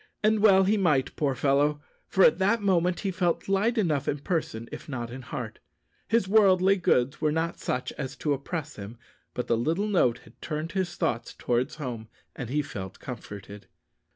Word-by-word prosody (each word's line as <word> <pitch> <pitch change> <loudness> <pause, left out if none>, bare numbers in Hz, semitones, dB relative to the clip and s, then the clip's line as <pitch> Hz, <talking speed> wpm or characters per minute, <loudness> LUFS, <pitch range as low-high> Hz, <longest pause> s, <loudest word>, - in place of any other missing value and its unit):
And 215 0 +3
well 195 -2 +6
he 205 +3 +2
might, 150 -9 +1
poor 140 -3 0
fellow, 145 +3 +2 0.3
for 190 - +3
at 160 - +5
that 205 +5 +3
moment 180 -2 +2
he 195 - -1
felt 175 -2 0
light 205 +5 +1
enough 155 -9 +1
in 145 - 0
person 140 - -3
if - - -9
not 120 -4 -4
in 130 +2 -7
heart. 120 -2 -6 0.5
His 225 -3 +2
worldly 195 -2 +5
goods 135 -6 +1
were 155 -1 +2
not 165 +2 -1
such 125 0 -2
as 130 - -4
to 150 - 0
oppress 150 +2 -5
him; 105 +3 -8 0.4
but 125 - -2
the 115 - +2
little 160 - 0
note 170 - +2
had - - -20
turned 155 +1 -4
his 185 -2 -2
thoughts 115 0 -2
towards 120 +1 -1
home, 120 -7 -5 0.3
and 125 -3 -6
he 150 +3 0
felt 95 -7 -7
comforted. 105 -4 -9
150 Hz, 185 wpm, -27 LUFS, 125-190 Hz, 0.5 s, well